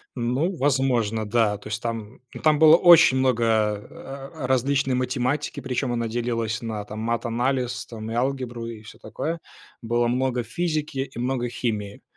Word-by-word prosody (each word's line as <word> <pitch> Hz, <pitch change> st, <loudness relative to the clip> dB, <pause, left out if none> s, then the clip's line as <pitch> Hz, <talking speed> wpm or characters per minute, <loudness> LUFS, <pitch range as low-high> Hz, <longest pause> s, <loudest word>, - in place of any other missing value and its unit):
Ну, 130 Hz, +10 st, 0 dB
возможно, 125 Hz, -6 st, +1 dB
да. 105 Hz, -1 st, +2 dB
То 105 Hz, -, -12 dB
есть 110 Hz, +1 st, -3 dB
там 115 Hz, -1 st, -5 dB
ну -, -, -8 dB
там 155 Hz, -1 st, +3 dB
было 160 Hz, 0 st, +8 dB
очень 170 Hz, -6 st, +7 dB
много, 130 Hz, -3 st, +2 dB, 0.5 s
э, 135 Hz, 0 st, -9 dB
э, -, -, -1 dB
различной 130 Hz, +1 st, +1 dB
математики, 130 Hz, +3 st, -1 dB
причём 125 Hz, -1 st, -2 dB
она 115 Hz, -1 st, -1 dB
делилась 115 Hz, -1 st, -2 dB
на, 110 Hz, -3 st, -4 dB
там, 105 Hz, +1 st, -8 dB
матанализ, 120 Hz, +2 st, -1 dB
там, 110 Hz, -1 st, -7 dB
и -, -, -3 dB
алгебру, 125 Hz, -2 st, -2 dB
и 110 Hz, -2 st, -8 dB
всё 110 Hz, -, -13 dB
такое. 165 Hz, +2 st, -4 dB, 0.4 s
Было 120 Hz, +1 st, +1 dB
много 125 Hz, 0 st, 0 dB
физики, 155 Hz, 0 st, -2 dB
и -, -, -8 dB
много 125 Hz, -1 st, -1 dB
химии. 105 Hz, -4 st, -3 dB
120 Hz, 165 wpm, -24 LUFS, 115-135 Hz, 0.5 s, было